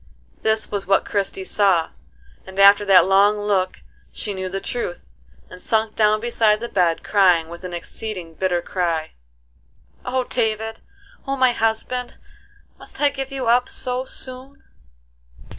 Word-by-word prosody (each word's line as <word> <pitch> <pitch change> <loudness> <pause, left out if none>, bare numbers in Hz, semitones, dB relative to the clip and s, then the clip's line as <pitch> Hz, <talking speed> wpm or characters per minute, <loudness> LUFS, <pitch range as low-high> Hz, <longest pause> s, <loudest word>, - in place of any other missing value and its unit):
This 220 0 0
was 200 -3 -3
what 195 0 +3
Christie 195 -1 -2
saw, 185 -4 +2 0.6
and 190 0 -11
after 200 +1 +7
that 195 -2 +6
long 200 +2 +4
look 200 -3 -1 0.3
she 205 - -3
knew 190 -1 -4
the 195 +1 -3
truth, 195 -3 -5 0.4
and 180 - -12
sunk 220 -1 0
down 215 0 +3
beside 220 -2 +2
the 235 - -4
bed, 175 -6 +1
crying 180 -5 +3
with 170 +2 -10
an 180 - -6
exceeding 175 0 -6
bitter 175 0 -1
cry: 170 -4 -2 0.9
"O 255 +1 -1
David, 225 -2 -2 0.5
O 275 0 -1
my 255 -1 +4
husband, 235 +2 -2 0.6
must - - -9
I 290 - +4
give 270 -1 -6
you 265 -2 -3
up 245 +2 +3
so 250 0 -3
soon?" 260 +1 -8
210 Hz, 145 wpm, -21 LUFS, 185-235 Hz, 0.9 s, after